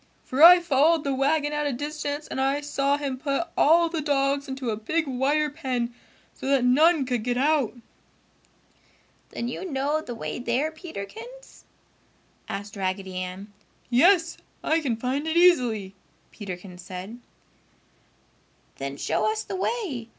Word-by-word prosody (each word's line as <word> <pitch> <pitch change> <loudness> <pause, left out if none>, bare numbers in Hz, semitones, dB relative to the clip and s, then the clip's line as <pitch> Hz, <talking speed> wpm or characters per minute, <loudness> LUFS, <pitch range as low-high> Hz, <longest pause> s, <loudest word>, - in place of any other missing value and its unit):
For 260 +3 -2
I 355 +2 +10
followed 320 0 +3
the 280 - -1
wagon 295 +2 +1
at 295 0 -1
a - - 0
distance 290 +2 -4
and 265 - -3
I 275 +2 +1
saw 285 -1 0
him 275 -3 -4
put 285 +4 -2
all 335 +3 +5
the 330 -1 -3
dogs 280 -1 0
into 265 -3 -3
a - - -1
big 310 +10 -1
wire 285 +3 0
pen, 255 -5 -3 0.4
so - - -7
that 270 -2 +3
none 300 +4 +4
could 245 -3 -2
get 245 +1 -1
out!" 280 -3 +1 1.5
"Then 235 - -4
you 245 - -5
know 295 -2 -1
the 245 -6 -7
way 230 - -5
there, 250 +6 0
Peterkins?" 385 - -10 0.8
asked 200 +1 -6
Raggedy 190 -1 -3
Ann. 185 +3 -6 0.4
"Yes, 340 +6 +4 0.3
I 320 - +2
can 260 -6 -1
find 265 +6 -2
it 320 +1 0
easily," 245 - +3 0.4
Peterkins 180 -3 -8
said. 190 +5 -8 1.6
"Then 140 0 -5
show 215 +10 0
us 215 0 -3
the - - -6
way!" 370 - -3
275 Hz, 150 wpm, -25 LUFS, 235-310 Hz, 1.6 s, I